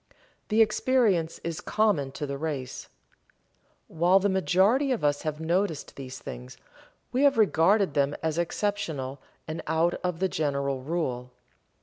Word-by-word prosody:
The 220 Hz, +1 st, +5 dB
experience 215 Hz, -9 st, +1 dB
is 165 Hz, -1 st, -4 dB
common 200 Hz, -11 st, +1 dB
to 150 Hz, -, -4 dB
the 140 Hz, -1 st, -5 dB
race. 140 Hz, -5 st, -4 dB, 1.0 s
While 175 Hz, +4 st, +3 dB
the 200 Hz, +1 st, +2 dB
majority 195 Hz, +8 st, +3 dB
of 245 Hz, -, -1 dB
us 145 Hz, -1 st, +1 dB
have 155 Hz, -1 st, -3 dB
noticed 170 Hz, 0 st, -1 dB
these 130 Hz, -2 st, -8 dB
things, 60 Hz, +1 st, -9 dB, 0.5 s
we 255 Hz, -, 0 dB
have 280 Hz, -2 st, +4 dB
regarded 195 Hz, -3 st, +3 dB
them 145 Hz, 0 st, +1 dB
as 160 Hz, +1 st, 0 dB
exceptional 160 Hz, -8 st, -2 dB, 0.3 s
and 155 Hz, +1 st, -4 dB
out 160 Hz, +2 st, +2 dB
of 180 Hz, -2 st, -1 dB
the 190 Hz, +2 st, +1 dB
general 140 Hz, -5 st, -1 dB
rule. 130 Hz, -5 st, -3 dB
165 Hz, 140 wpm, -27 LUFS, 145-200 Hz, 1.0 s, The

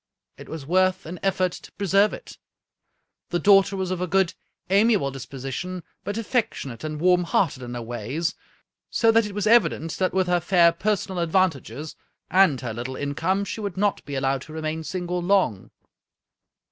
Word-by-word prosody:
It -, -, -12 dB
was 155 Hz, -3 st, -6 dB
worth 185 Hz, +3 st, +2 dB
an 175 Hz, +3 st, -7 dB
effort 185 Hz, -2 st, +1 dB
to -, -, -11 dB
preserve 200 Hz, +1 st, +3 dB
it. -, -, -10 dB, 0.9 s
The 175 Hz, -, 0 dB
daughter 195 Hz, +2 st, +4 dB
was 190 Hz, -1 st, -2 dB
of 180 Hz, -1 st, -2 dB
a 180 Hz, -, -1 dB
good, 185 Hz, 0 st, +2 dB, 0.4 s
amiable 200 Hz, -7 st, +3 dB
disposition, 135 Hz, +7 st, -6 dB, 0.2 s
but 205 Hz, +1 st, -4 dB
affectionate 210 Hz, -, -2 dB
and 155 Hz, -1 st, -4 dB
warm 180 Hz, +1 st, +4 dB
hearted 165 Hz, -6 st, 0 dB
in 120 Hz, 0 st, -6 dB
her 120 Hz, -, -4 dB
ways, 120 Hz, -, -3 dB, 0.6 s
so 225 Hz, -1 st, +3 dB
that 225 Hz, -1 st, +3 dB
it 200 Hz, -, -9 dB
was 205 Hz, -, -1 dB
evident 215 Hz, -8 st, +3 dB
that 185 Hz, -1 st, +1 dB
with 190 Hz, 0 st, +1 dB
her 180 Hz, 0 st, +2 dB
fair 175 Hz, -1 st, +4 dB
personal 190 Hz, +1 st, -1 dB
advantages, 160 Hz, -, 0 dB, 0.4 s
and 180 Hz, -8 st, +4 dB
her 120 Hz, -3 st, -4 dB
little 120 Hz, +3 st, -5 dB
income, 165 Hz, +9 st, -1 dB
she 220 Hz, -, -5 dB
would 200 Hz, -3 st, -4 dB
not 205 Hz, 0 st, 0 dB
be 140 Hz, -, -6 dB
allowed 135 Hz, 0 st, 0 dB
to 155 Hz, -, -11 dB
remain 160 Hz, 0 st, -3 dB
single 180 Hz, +3 st, -3 dB
long. 175 Hz, -, +1 dB
180 Hz, 170 wpm, -24 LUFS, 145-195 Hz, 0.9 s, daughter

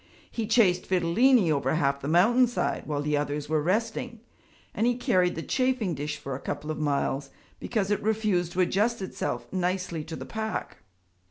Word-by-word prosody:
He 225 Hz, -3 st, -3 dB
chased 205 Hz, -6 st, +3 dB
Fidilini 185 Hz, +3 st, +3 dB
over 140 Hz, -1 st, +1 dB
half 140 Hz, -3 st, +1 dB
the 140 Hz, -, -4 dB
mountainside 235 Hz, -, +2 dB
while 145 Hz, -1 st, -2 dB
the 150 Hz, 0 st, 0 dB
others 145 Hz, 0 st, -2 dB
were 155 Hz, 0 st, +1 dB
resting, 225 Hz, +6 st, -1 dB, 0.5 s
and 230 Hz, -, +1 dB
he 245 Hz, -, +2 dB
carried 180 Hz, -7 st, +2 dB
the 165 Hz, -, -4 dB
chafing 255 Hz, -8 st, 0 dB
dish 150 Hz, +1 st, -4 dB
for 135 Hz, -, -6 dB
a 130 Hz, -, -4 dB
couple 145 Hz, +2 st, -4 dB
of 155 Hz, -, -5 dB
miles 140 Hz, -2 st, -1 dB, 0.3 s
because 210 Hz, -4 st, -1 dB
it 205 Hz, -, +1 dB
refused 210 Hz, -5 st, 0 dB
to 185 Hz, -, +1 dB
adjust 200 Hz, +5 st, +1 dB
itself 190 Hz, -, -3 dB
nicely 180 Hz, -3 st, -1 dB
to 160 Hz, 0 st, -6 dB
the -, -, -7 dB
pack. 220 Hz, -1 st, -4 dB
180 Hz, 175 wpm, -27 LUFS, 150-220 Hz, 0.5 s, chased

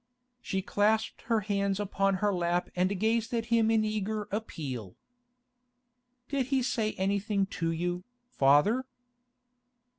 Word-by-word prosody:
She 190 Hz, 0 st, -2 dB
clasped 215 Hz, +3 st, +1 dB
her 225 Hz, -2 st, +3 dB
hands 200 Hz, -1 st, 0 dB
upon 195 Hz, -1 st, +1 dB
her 205 Hz, +2 st, +1 dB
lap 175 Hz, 0 st, 0 dB
and 185 Hz, +2 st, +1 dB
gazed 225 Hz, +2 st, +1 dB
at 230 Hz, -1 st, -1 dB
him 225 Hz, -1 st, +4 dB
in 220 Hz, -1 st, +3 dB
eager 215 Hz, 0 st, -2 dB
appeal. 135 Hz, -, -5 dB, 1.3 s
'Did 270 Hz, -2 st, -1 dB
he 265 Hz, -1 st, +1 dB
say 225 Hz, -3 st, 0 dB
anything 200 Hz, +1 st, 0 dB, 0.2 s
to 165 Hz, -, +2 dB
you, 175 Hz, +2 st, -2 dB, 0.2 s
father? 210 Hz, -, +3 dB
205 Hz, 125 wpm, -30 LUFS, 185-220 Hz, 1.3 s, him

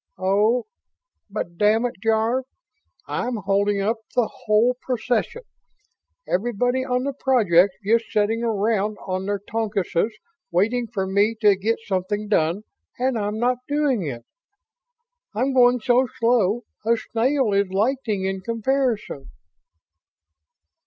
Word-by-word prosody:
Oh... 205 Hz, +6 st, +2 dB, 0.6 s
but 175 Hz, -4 st, -5 dB
damn 215 Hz, +3 st, +3 dB
it, 245 Hz, -, -2 dB
Jarve, 225 Hz, +3 st, +1 dB, 0.6 s
I'm 245 Hz, +1 st, -2 dB
holding 200 Hz, 0 st, 0 dB
up 220 Hz, +4 st, 0 dB, 0.2 s
the 245 Hz, -3 st, +3 dB, 0.2 s
whole 225 Hz, +4 st, +3 dB
procession. 250 Hz, -, -2 dB, 0.8 s
Everybody 240 Hz, +5 st, 0 dB
on 250 Hz, -1 st, -1 dB
the 280 Hz, +1 st, -2 dB
project's 200 Hz, -9 st, +3 dB
just 230 Hz, +2 st, +3 dB
sitting 215 Hz, +2 st, +1 dB
around 215 Hz, -2 st, 0 dB
on 185 Hz, 0 st, -3 dB
their 205 Hz, 0 st, 0 dB
tokuses 205 Hz, -4 st, -1 dB, 0.4 s
waiting 225 Hz, +7 st, +1 dB
for 200 Hz, -4 st, -3 dB
me 200 Hz, +4 st, +2 dB
to 205 Hz, -2 st, +6 dB
get 215 Hz, +4 st, 0 dB
something 205 Hz, +2 st, -2 dB
done 175 Hz, 0 st, +1 dB, 0.3 s
and 255 Hz, +1 st, 0 dB
I'm 210 Hz, -1 st, -2 dB
not 245 Hz, +2 st, +1 dB
doing 290 Hz, -6 st, +1 dB
it. 130 Hz, -8 st, -5 dB, 1.1 s
I'm 260 Hz, +5 st, 0 dB
going 250 Hz, -1 st, +5 dB
so 245 Hz, +3 st, +3 dB
slow 230 Hz, -1 st, +2 dB, 0.2 s
a 230 Hz, +2 st, +2 dB
snail 245 Hz, 0 st, 0 dB
is 200 Hz, 0 st, +2 dB
lightning 215 Hz, 0 st, 0 dB
in 190 Hz, 0 st, -2 dB
comparison!" 230 Hz, -, -1 dB
220 Hz, 125 wpm, -23 LUFS, 200-245 Hz, 1.1 s, to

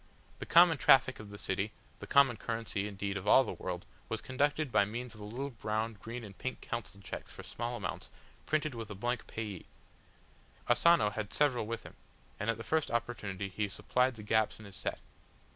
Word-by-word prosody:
The -, -, -6 dB
common 170 Hz, -3 st, +7 dB
traffic 130 Hz, 0 st, +6 dB
of 110 Hz, -2 st, -9 dB
the 100 Hz, -, -9 dB
city, 100 Hz, +2 st, -2 dB, 0.3 s
the -, -, -8 dB
common 140 Hz, -4 st, +6 dB
currency 110 Hz, -3 st, -2 dB
indeed 100 Hz, 0 st, -3 dB
of 95 Hz, +1 st, -6 dB
all 135 Hz, -, +8 dB
the 120 Hz, -, -4 dB
world, 90 Hz, -1 st, -5 dB, 0.2 s
was -, -, -1 dB
conducted 145 Hz, +2 st, 0 dB
by 100 Hz, -, +5 dB
means 120 Hz, +3 st, -5 dB
of 105 Hz, -, -13 dB
the 105 Hz, -, -7 dB
little 135 Hz, +6 st, -4 dB
brown, 110 Hz, 0 st, -2 dB
green 120 Hz, +2 st, -6 dB
and 100 Hz, -3 st, -9 dB
pink 130 Hz, +6 st, -4 dB
council 115 Hz, -4 st, -5 dB
cheques -, -, -6 dB
for -, -, -10 dB
small 120 Hz, +1 st, -3 dB
amounts, 95 Hz, -7 st, -4 dB, 0.4 s
printed 155 Hz, -2 st, +1 dB
with 115 Hz, -2 st, -6 dB
a 105 Hz, -, -6 dB
blank 120 Hz, +4 st, -2 dB
payee. 105 Hz, -5 st, -5 dB, 1.0 s
Asano 120 Hz, -3 st, +5 dB
had 105 Hz, -1 st, -4 dB
several 130 Hz, -7 st, +2 dB
with 115 Hz, 0 st, -4 dB
him, -, -, -11 dB, 0.5 s
and 105 Hz, -, -1 dB
at 115 Hz, -, +1 dB
the 115 Hz, -, -6 dB
first 155 Hz, +6 st, +1 dB
opportunity 105 Hz, -5 st, -2 dB
he 105 Hz, +2 st, -2 dB
supplied 125 Hz, +5 st, +1 dB
the 110 Hz, -, -9 dB
gaps 110 Hz, 0 st, +2 dB
in 110 Hz, -, -12 dB
his 100 Hz, -2 st, -11 dB
set. -, -, -2 dB
115 Hz, 200 wpm, -33 LUFS, 105-125 Hz, 1.0 s, all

